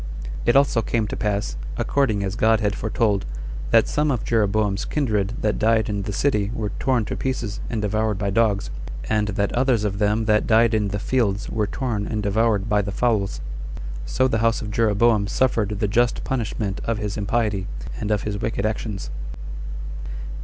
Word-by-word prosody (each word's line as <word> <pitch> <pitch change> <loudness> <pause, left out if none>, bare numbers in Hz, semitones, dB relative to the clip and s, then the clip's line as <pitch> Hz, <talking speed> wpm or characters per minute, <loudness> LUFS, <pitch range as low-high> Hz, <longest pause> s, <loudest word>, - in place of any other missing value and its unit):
It 120 - +4
also 135 -4 +4
came 110 0 0
to - - -3
pass, 105 -1 -1 0.2
according 110 -8 +1
as 95 -1 -2
God 110 0 +4
had 105 -2 +1
foretold, 110 -3 +1 0.5
that - - +5
some 150 0 +1
of 125 -6 0
Jeroboam's 105 -2 +1
kindred 110 -7 0
that 105 - 0
died 110 0 +3
in 100 -1 -1
the 100 +1 -3
city 105 -2 +1
were 105 -2 -2
torn 125 -5 +2
to - - -3
pieces 120 -5 -2
and 110 -3 -2
devoured 110 0 0
by 100 0 -1
dogs, 105 -2 +2 0.4
and 105 -1 +2
that 100 0 -1
others 125 -3 +2
of 100 -1 -1
them 105 +1 +2
that 105 0 +3
died 115 +1 +5
in 105 -2 +2
the 100 +1 -2
fields 105 -2 0
were 110 -2 0
torn 110 -4 -2
and 105 -2 -2
devoured 105 0 +2
by 105 -1 +3
the 100 0 -3
fowls. 105 -3 0 0.7
So 130 - +2
the 110 -4 0
house 115 +1 +2
of 105 - -5
Jeroboam 110 -1 +3
suffered 105 -3 +1
the 105 - +1
just 120 +3 +2
punishment 110 -5 -2
of 115 -1 -1
his 105 -1 -3
impiety, 105 -2 0 0.3
and 105 - -3
of 105 -2 +1
his 105 -1 -3
wicked 105 -1 -1
actions. 105 -8 -3
110 Hz, 180 wpm, -23 LUFS, 100-115 Hz, 0.7 s, that